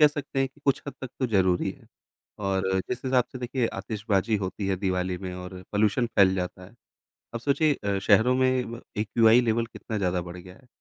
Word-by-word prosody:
कह 150 Hz, -, +9 dB
सकते 145 Hz, -1 st, -3 dB
हैं 135 Hz, 0 st, +2 dB
कि 145 Hz, +2 st, -26 dB
कुछ 140 Hz, -, +2 dB
हद 140 Hz, -, -5 dB
तक 130 Hz, -, -5 dB
तो 130 Hz, -, +1 dB
ज़रूरी 95 Hz, -5 st, +2 dB
है। -, -, -14 dB, 0.6 s
और 95 Hz, -1 st, +1 dB, 0.3 s
जिस 125 Hz, +1 st, -4 dB
हिसाब 130 Hz, -2 st, +3 dB
से 130 Hz, -, -6 dB
देखिए 125 Hz, -1 st, -1 dB
आतिशबाज़ी 105 Hz, 0 st, 0 dB
होती 95 Hz, +1 st, -3 dB
है 95 Hz, -, +1 dB
दिवाली 90 Hz, -1 st, -1 dB
में 95 Hz, -2 st, -6 dB
और 90 Hz, 0 st, -8 dB
पॉल्यूशन 110 Hz, +4 st, +2 dB
फैल 95 Hz, -1 st, +6 dB
जाता 90 Hz, 0 st, -4 dB
है। 100 Hz, +6 st, -16 dB, 0.6 s
अब 115 Hz, -, -3 dB
सोचिए 145 Hz, +4 st, +2 dB
अ, 100 Hz, -5 st, -2 dB
शहरों 125 Hz, +6 st, +4 dB
में 130 Hz, -2 st, +1 dB
ब 120 Hz, -, -7 dB, 0.2 s
एक्यूआई 115 Hz, +2 st, +5 dB
लेवल 115 Hz, 0 st, +1 dB
कितना 110 Hz, -1 st, -6 dB
ज़्यादा 90 Hz, -2 st, 0 dB
बढ़ 85 Hz, +1 st, -8 dB
गया 90 Hz, +1 st, -12 dB
है, 130 Hz, -, -22 dB
110 Hz, 210 wpm, -26 LUFS, 95-125 Hz, 0.6 s, कह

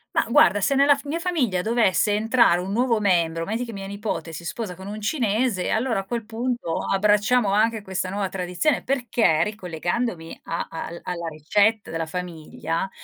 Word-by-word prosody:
Mah, -, -, +3 dB
guarda, 205 Hz, -3 st, +5 dB
se 205 Hz, -, +1 dB
nella 280 Hz, +1 st, +5 dB
f 280 Hz, -, -10 dB
mia 305 Hz, +4 st, -2 dB
famiglia 285 Hz, -, 0 dB
dovesse 215 Hz, -1 st, +2 dB
entrare 220 Hz, -4 st, +3 dB
1 185 Hz, +2 st, -4 dB
nuovo 235 Hz, +1 st, +2 dB
membro, 170 Hz, -5 st, +1 dB
metti 225 Hz, +5 st, -2 dB
che 230 Hz, -2 st, -7 dB
mia 195 Hz, -1 st, -6 dB
nipote 200 Hz, -4 st, -4 dB
si 170 Hz, -, -7 dB
sposa 195 Hz, +2 st, -4 dB
con 190 Hz, +2 st, -10 dB
un 210 Hz, +1 st, -6 dB
cinese, 220 Hz, -, 0 dB
allora 230 Hz, -1 st, 0 dB
a -, -, -3 dB
quel 230 Hz, +1 st, -4 dB
punto 235 Hz, -6 st, -2 dB
abbracciamo 210 Hz, +2 st, +2 dB
anche 220 Hz, +1 st, +2 dB
questa 190 Hz, -1 st, -3 dB
nuova 200 Hz, +1 st, -2 dB
tradizione. 185 Hz, -, -1 dB
Perché, 235 Hz, -, +2 dB
ricollegandomi 180 Hz, -1 st, -3 dB
a 170 Hz, -, -3 dB
al 165 Hz, +1 st, -6 dB
alla 170 Hz, -2 st, -4 dB
ricetta 200 Hz, +8 st, +1 dB
della 165 Hz, 0 st, -3 dB
famiglia 165 Hz, 0 st, -4 dB
205 Hz, 175 wpm, -24 LUFS, 180-235 Hz, -, guarda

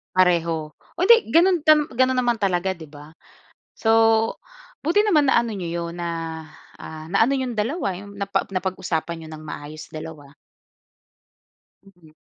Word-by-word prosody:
Pareho. 170 Hz, -4 st, +2 dB, 0.2 s
O, -, -, -13 dB
hindi 465 Hz, -, +6 dB
gano'n 355 Hz, +2 st, +5 dB
tam 305 Hz, -1 st, +6 dB
gano'n 255 Hz, +1 st, +2 dB
naman 240 Hz, -2 st, +1 dB
talaga, 190 Hz, -1 st, 0 dB
'di 165 Hz, -4 st, -9 dB
ba? 145 Hz, +1 st, -13 dB, 0.6 s
So, 225 Hz, -, 0 dB, 0.9 s
buti 345 Hz, +7 st, +3 dB
naman 315 Hz, -9 st, +3 dB
naano 235 Hz, -2 st, +3 dB
niyo 175 Hz, -3 st, -5 dB, 0.2 s
'yon, 175 Hz, -, -10 dB
na, 170 Hz, -, -3 dB, 0.7 s
ah, 155 Hz, 0 st, -9 dB
naano 225 Hz, +7 st, +3 dB
yung 260 Hz, -3 st, -2 dB
dalawa, 210 Hz, -, -1 dB
yung 200 Hz, 0 st, -11 dB
napa 200 Hz, 0 st, -2 dB
napag-usapan 175 Hz, -3 st, -3 dB
niyo -, -, -11 dB
ng 155 Hz, 0 st, -9 dB
maayos 150 Hz, 0 st, -8 dB
dalawa. 155 Hz, -2 st, -9 dB, 1.6 s
Mm. 175 Hz, -5 st, -20 dB
190 Hz, 140 wpm, -23 LUFS, 160-255 Hz, 1.6 s, hindi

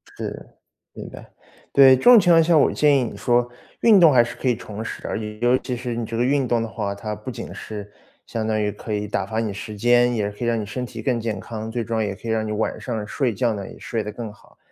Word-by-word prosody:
是， -, -, -6 dB, 0.5 s
是 -, -, -8 dB
的。 -, -, -13 dB, 0.4 s
对， 135 Hz, -1 st, +7 dB
这 130 Hz, -, -7 dB
种 245 Hz, -2 st, +9 dB
情 175 Hz, -3 st, +4 dB
况 165 Hz, -1 st, +6 dB
下， 160 Hz, 0 st, +3 dB
我 -, -, +3 dB
建 145 Hz, -2 st, +4 dB
议 130 Hz, -, +1 dB
你 115 Hz, -, -6 dB
说 120 Hz, 0 st, +1 dB, 0.3 s
运 215 Hz, -4 st, +6 dB
动 165 Hz, -4 st, +7 dB
还 120 Hz, -2 st, +5 dB
是 120 Hz, -, -7 dB
可 130 Hz, -, -2 dB
以 120 Hz, -, +2 dB
重 105 Hz, +2 st, -7 dB
拾 -, -, -6 dB
啊， -, -, -3 dB, 0.3 s
尤 120 Hz, +1 st, +4 dB
其 125 Hz, -1 st, -4 dB
是 120 Hz, 0 st, -4 dB
你 115 Hz, 0 st, -3 dB
这 115 Hz, +1 st, -5 dB
个 120 Hz, -, +1 dB
运 135 Hz, 0 st, +1 dB
动 115 Hz, -1 st, +1 dB
的 115 Hz, -, -3 dB
话， 105 Hz, -3 st, -3 dB
它 105 Hz, +1 st, -5 dB
不 -, -, -8 dB
仅 -, -, -8 dB
是 105 Hz, -1 st, -8 dB, 0.3 s
相 110 Hz, -1 st, -3 dB
当 110 Hz, -1 st, 0 dB
于 105 Hz, -1 st, 0 dB
可 110 Hz, +1 st, -7 dB
以 105 Hz, 0 st, -2 dB
打 100 Hz, -1 st, -2 dB
发 110 Hz, +3 st, -4 dB
你 110 Hz, -2 st, -1 dB
时 105 Hz, +2 st, -7 dB
间， 120 Hz, +2 st, +3 dB
也 105 Hz, -3 st, -1 dB
可 105 Hz, +4 st, -6 dB
以 -, -, 0 dB
让 115 Hz, -1 st, +1 dB
你 105 Hz, -, -5 dB
身 125 Hz, +4 st, -4 dB
体 120 Hz, -2 st, -8 dB
更 120 Hz, 0 st, 0 dB
健 110 Hz, -3 st, -3 dB
康， 110 Hz, +2 st, -6 dB
最 120 Hz, 0 st, -3 dB
终 115 Hz, 0 st, -1 dB
也 100 Hz, -2 st, -2 dB
可 105 Hz, -, -13 dB
以 -, -, -2 dB
让 110 Hz, -1 st, 0 dB
你 -, -, -4 dB
晚 105 Hz, +1 st, -2 dB
上 110 Hz, -4 st, -4 dB
睡 125 Hz, +1 st, -1 dB
觉 115 Hz, +2 st, 0 dB
呢 100 Hz, -2 st, -6 dB
也 -, -, -13 dB
睡 115 Hz, -2 st, -3 dB
得 105 Hz, -, -5 dB
更 110 Hz, -1 st, -7 dB
好。 105 Hz, -, -23 dB
115 Hz, 300 characters per minute, -22 LUFS, 105-125 Hz, 0.5 s, 种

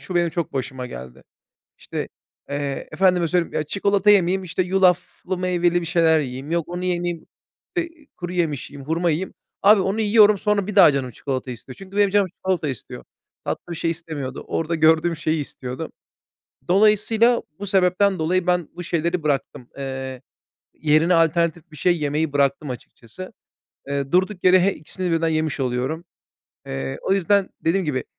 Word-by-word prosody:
şu, 185 Hz, -, -7 dB
benim 175 Hz, -1 st, +2 dB
çok 170 Hz, 0 st, -3 dB
başıma 130 Hz, -1 st, -4 dB
geldi. 65 Hz, -, -10 dB, 0.6 s
İşte, -, -, -5 dB, 0.4 s
eee, 140 Hz, -1 st, -3 dB
efendime 180 Hz, -2 st, +3 dB
söyleyeyim, 175 Hz, 0 st, 0 dB
ya, 155 Hz, -, 0 dB
çikolata 200 Hz, +5 st, +1 dB
yemeyeyim, 190 Hz, -1 st, +3 dB
işte, 185 Hz, +1 st, -1 dB
yulaflı, 180 Hz, 0 st, +1 dB
meyveli 175 Hz, -1 st, +1 dB
bir -, -, -5 dB
şeyler 165 Hz, -2 st, +3 dB
yiyeyim, 135 Hz, +1 st, -5 dB
yok, 170 Hz, -1 st, -1 dB
onu 180 Hz, +1 st, -4 dB
yemeyeyim, 175 Hz, -2 st, -2 dB, 0.5 s
işte, 340 Hz, -1 st, -1 dB, 0.3 s
kuru 175 Hz, 0 st, -5 dB
yemiş 160 Hz, -6 st, -1 dB
yiyeyim, 140 Hz, -1 st, -11 dB
hurma 170 Hz, +2 st, +1 dB
yiyeyim. 165 Hz, +4 st, -2 dB, 0.3 s
Abi, 205 Hz, 0 st, +6 dB
onu 195 Hz, +4 st, -1 dB
yiyorum, 210 Hz, -1 st, +5 dB
sonra 205 Hz, -1 st, 0 dB
bir 210 Hz, -, -5 dB
daha 185 Hz, -6 st, +8 dB
canım 135 Hz, -3 st, -2 dB
çikolata 130 Hz, +2 st, -4 dB
istiyor. 125 Hz, +2 st, -10 dB
Çünkü 195 Hz, +1 st, -10 dB
benim 205 Hz, -1 st, +4 dB
canım 200 Hz, 0 st, +3 dB
çikolata 185 Hz, -3 st, -2 dB
istiyor. 130 Hz, -6 st, -7 dB, 0.4 s
Tatlı 175 Hz, -, -4 dB
bir 170 Hz, -, -4 dB
şey 165 Hz, -, 0 dB
istemiyordu. 155 Hz, -6 st, -6 dB
Orada 165 Hz, +1 st, -1 dB
gördüğüm 160 Hz, +1 st, +3 dB
şeyi 155 Hz, 0 st, -1 dB
istiyordu. 130 Hz, +2 st, -6 dB, 0.8 s
Dolayısıyla, 215 Hz, +4 st, +4 dB, 0.2 s
bu 200 Hz, -, -5 dB
sebepten 190 Hz, 0 st, +2 dB
dolayı, 175 Hz, +3 st, 0 dB
ben 180 Hz, -2 st, +1 dB
bu 175 Hz, -, -6 dB
şeyleri 170 Hz, 0 st, -1 dB
bıraktım. 135 Hz, -4 st, -2 dB
Iıı, 130 Hz, -1 st, -5 dB, 0.5 s
yerine 155 Hz, +3 st, +3 dB
alternatif 165 Hz, 0 st, +1 dB
bir 155 Hz, -, -13 dB
şey 175 Hz, +4 st, +2 dB
yemeyi 150 Hz, +1 st, -1 dB
bıraktım 140 Hz, 0 st, +1 dB
açıkçası. 125 Hz, +6 st, -10 dB, 0.6 s
Iıı, 140 Hz, -1 st, -3 dB
durduk 185 Hz, +1 st, +1 dB
yere, 185 Hz, 0 st, +6 dB
he 195 Hz, +2 st, +3 dB
ikisini 180 Hz, +4 st, -4 dB
birden 165 Hz, 0 st, +1 dB
yemiş 155 Hz, -2 st, -1 dB
oluyorum. 130 Hz, +6 st, -2 dB, 0.6 s
Iıı, 65 Hz, 0 st, -4 dB
o -, -, 0 dB
yüzden, 195 Hz, +1 st, +2 dB
dediğim 185 Hz, +3 st, +1 dB
gibi 135 Hz, -5 st, -2 dB
170 Hz, 165 wpm, -22 LUFS, 145-185 Hz, 0.8 s, daha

